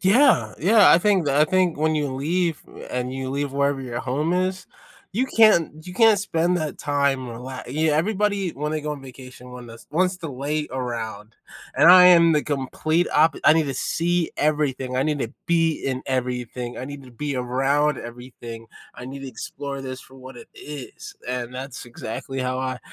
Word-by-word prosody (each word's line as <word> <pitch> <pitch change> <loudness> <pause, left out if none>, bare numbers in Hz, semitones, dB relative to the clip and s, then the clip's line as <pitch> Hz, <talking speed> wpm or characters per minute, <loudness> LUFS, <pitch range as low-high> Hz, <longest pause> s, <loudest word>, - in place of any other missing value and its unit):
Yeah, 250 +9 +4
yeah, 205 +3 +6
I - - +7
think 185 -4 +2
I 145 +2 +4
think 185 0 +1
when 155 +1 +1
you 150 -2 0
leave 165 +3 -1 0.3
and 125 0 -3
you 130 0 -4
leave 140 0 -2
wherever 140 0 0
your 120 -2 -4
home 145 +6 -1
is, 185 +1 -1 0.5
you 245 +7 0
can't 170 - +3
you 180 - -7
can't 220 +1 +5
spend 175 -2 0
that 155 -3 -4
time 140 -2 0
rela 125 +2 -7
yeah, 155 +1 +1
everybody, 200 +4 0
when 150 +2 -4
they 155 - -1
go 150 0 -3
on 145 -2 -8
vacation, 125 -1 -12
one 125 -1 -10
that's 115 0 -13
wants 180 +4 +1
to 165 - -6
lay 150 +4 -2
around, 115 -4 -5 0.4
and - - +7
I 180 0 +9
am 170 -2 +7
the 150 -1 +2
complete 155 +4 -1
oppo 155 0 +3
I - - +8
need 160 -1 +2
to 135 - -3
see 170 +5 0
everything, 140 -4 0
I 130 - +2
need 150 0 -1
to 115 -4 -4
be 165 -1 +2
in 130 -1 -2
everything, 125 -2 -3
I 130 - -5
need 145 0 -8
to 130 - -14
be 140 +3 -4
around 135 +4 +1
everything. 120 -1 -10 0.3
I - - -9
need 135 +2 -8
to 135 - -7
explore 140 +1 -6
this 130 -1 -6
for 130 - -17
what 130 0 -11
it - - -12
is, 145 -3 -9
and 125 0 -4
that's 130 0 -7
exactly 120 +2 -7
how 130 0 -2
I 130 -1 -3
140 Hz, 195 wpm, -23 LUFS, 130-165 Hz, 0.5 s, I